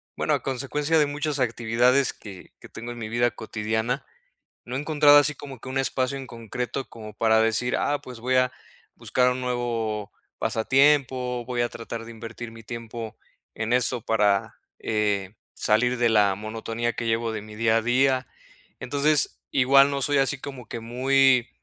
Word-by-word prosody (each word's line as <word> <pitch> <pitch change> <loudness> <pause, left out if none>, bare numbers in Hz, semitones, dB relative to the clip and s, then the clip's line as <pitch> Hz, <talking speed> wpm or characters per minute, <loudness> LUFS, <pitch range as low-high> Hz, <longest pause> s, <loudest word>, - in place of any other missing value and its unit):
bueno, - - 0
a - - 0
consecuencia 140 +4 -1
de 150 - +4
muchas 145 0 -2
actividades 120 +2 +2
que 100 -4 -12
que - - -12
tengo 120 +2 -7
en - - -11
mi 110 -2 -5
vida 120 +2 +2
cotidiana, 110 +4 -3 0.6
no 125 - -5
he - - -1
encontrado 150 -1 +5
así 145 0 +4
como 140 -2 -10
que 130 - -11
un 135 +1 -1
espacio 130 0 0
en 135 - -8
concreto 120 +3 -5
como 110 -2 -10
para 110 0 +3
decir: 115 +2 +1
"Ah, 145 0 0
pues 125 -2 -10
voy 130 +2 0
a 125 0 +3 0.4
buscar 125 0 +1
un 125 +1 -3
nuevo 115 -4 -2 0.3
pasatiempo, 130 0 +2
voy 120 0 -2
a 120 - 0
tratar 115 0 -7
de 115 - -9
invertir 115 +1 -8
mi 115 0 -12
tiempo 115 0 -7 0.4
en 110 +2 -2
eso 125 -1 +1
para, 105 -3 +2 0.2
eh, 105 -3 -1 0.2
salir 120 +4 +2
de 120 0 +3
la 105 -3 +4
monotonía 115 +3 -3
que 115 - -4
llevo 115 0 0
de 110 -1 -4
mi 105 +1 -11
día 115 0 +2
a - - +1
día". 130 +2 +2 0.5
Entonces, 145 +3 +1
igual 135 +1 +5
no 140 0 -2
soy 145 -1 +2
así 135 +1 0
como 135 -5 -8
que 115 - -5
muy, 130 +2 +3
120 Hz, 180 wpm, -25 LUFS, 115-135 Hz, 0.6 s, encontrado